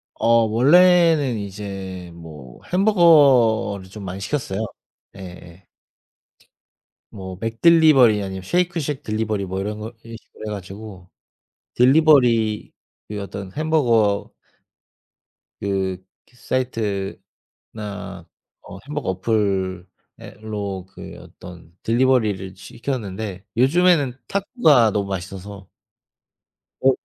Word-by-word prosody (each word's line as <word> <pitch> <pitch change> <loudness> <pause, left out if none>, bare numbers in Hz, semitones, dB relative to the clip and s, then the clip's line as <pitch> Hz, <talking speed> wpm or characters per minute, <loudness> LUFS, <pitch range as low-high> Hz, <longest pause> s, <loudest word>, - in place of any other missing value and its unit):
어 - - -2 0.2
원래는 150 +2 +4
이제 95 -3 -7
뭐 75 -7 -12
햄버거를 140 - +4
좀 105 +1 -10
많이 95 +1 -6
시켰어요. 110 -2 -3 0.5
예 - - -12
예. 90 0 -12 1.4
뭐 95 -3 -9
맥딜리버리 125 -2 +4
아니면 95 -1 -6
쉐이크쉑 160 - -1
딜리버리 110 -2 -2
뭐 95 +1 -4
이런 105 +2 -4
거 110 +2 -7
이런 115 0 -9
식으로 - - -20
해 105 - -4
가지고 95 -1 -9 0.7
딜리버리 125 -6 +3 0.4
그 105 -1 -5
어떤 100 -1 -8
햄버거 120 -10 +1 1.3
그, 95 -2 -1 0.3
그 - - -28
사이트나 110 -8 -3 1.4
어 - - -11
햄버거 150 -8 -4
어플에 95 -2 -1 0.6
로 100 -4 -5
그 - - -11
어떤 85 -2 -14
딜리버리를 110 -6 +1
시켰는데 105 -3 -6
요즘에는 145 +1 +3
타코가 170 - +3
너무 100 -1 -2
맛있어서 95 +1 -7 1.1
어 135 - +5
105 Hz, 220 characters per minute, -21 LUFS, 95-130 Hz, 1.4 s, 어